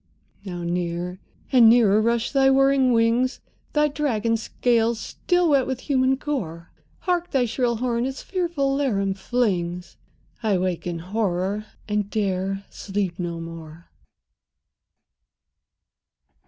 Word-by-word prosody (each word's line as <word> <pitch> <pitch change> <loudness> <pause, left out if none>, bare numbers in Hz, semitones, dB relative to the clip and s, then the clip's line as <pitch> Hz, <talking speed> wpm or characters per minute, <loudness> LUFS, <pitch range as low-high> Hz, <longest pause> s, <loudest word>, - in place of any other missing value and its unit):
Now 175 -3 -6
near 175 +1 -3 0.3
and 240 -4 +7
nearer 220 -3 +5
rush 235 +1 0
thy 270 -1 +4
whirring 270 -1 +4
wings, 235 +3 +2 0.3
Thy 300 0 +3
dragon 240 -7 0
scales 230 0 +1
still 355 +6 0
wet 275 -3 +3
with 260 -1 -3
human 265 -2 +2
gore. 190 - -4 0.3
Hark, 355 -1 0
thy 260 -3 +2
shrill 235 +1 0
horn 240 +1 -1
its 270 0 -6
fearful 340 -8 -1
laram 200 -9 0
flings! 185 -5 -2 0.4
—I 215 -4 +2
wake 180 -1 -2
in 175 -1 -3
horror, 195 +2 -2 0.2
and 210 -1 -1
'dare 195 -2 -1
sleep 195 -3 -3
no 170 -1 -3
more! 165 0 -10
225 Hz, 120 wpm, -24 LUFS, 185-265 Hz, 0.4 s, and